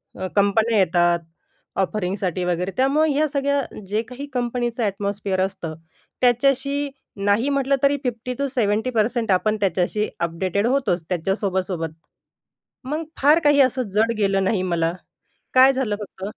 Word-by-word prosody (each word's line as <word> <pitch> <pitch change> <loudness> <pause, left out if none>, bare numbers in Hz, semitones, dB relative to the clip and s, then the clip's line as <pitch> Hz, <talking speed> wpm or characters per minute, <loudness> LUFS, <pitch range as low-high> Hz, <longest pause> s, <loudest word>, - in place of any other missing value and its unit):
अ, 185 - -4
कंपन्या 215 +3 +3
येतात 175 -1 +3 0.6
ऑफरिंगसाठी 185 -2 -2
वगैरे 180 +2 -1
त्यामुळे 290 +4 +3
या 305 +2 +2
सगळ्या 280 -1 0 0.3
जे 210 +2 +1
काही 255 +3 -7
कंपनीचं 240 -1 -1
एटमॉस्फिअर 200 -1 -1
असतं, 165 -4 -6 0.5
त्याच्याशी 275 +3 +2 0.4
नाही 215 +7 +2
म्हटलं 275 -1 +2
तरी 280 +1 +4
50-70% 235 -2 -1
आपण 215 +4 +2
त्याच्याशी 195 +3 0
अपडेटेड 185 +5 -1
होतोच, 250 -11 +1
त्याच्या 185 +2 0
सोबत-सोबत. 185 -5 -2 1.0
मग 305 +4 -2 0.2
फार 295 +4 +6
काही 290 -1 +5
असं 255 0 +2
जड 225 +2 +3
गेलं 195 -2 +2
नाही 190 -1 +1
मला. 170 -2 0 0.6
काय 260 +1 +7
झालं 255 -6 -1
फक्त 190 -2 -9
215 Hz, 130 wpm, -22 LUFS, 190-265 Hz, 1.0 s, काय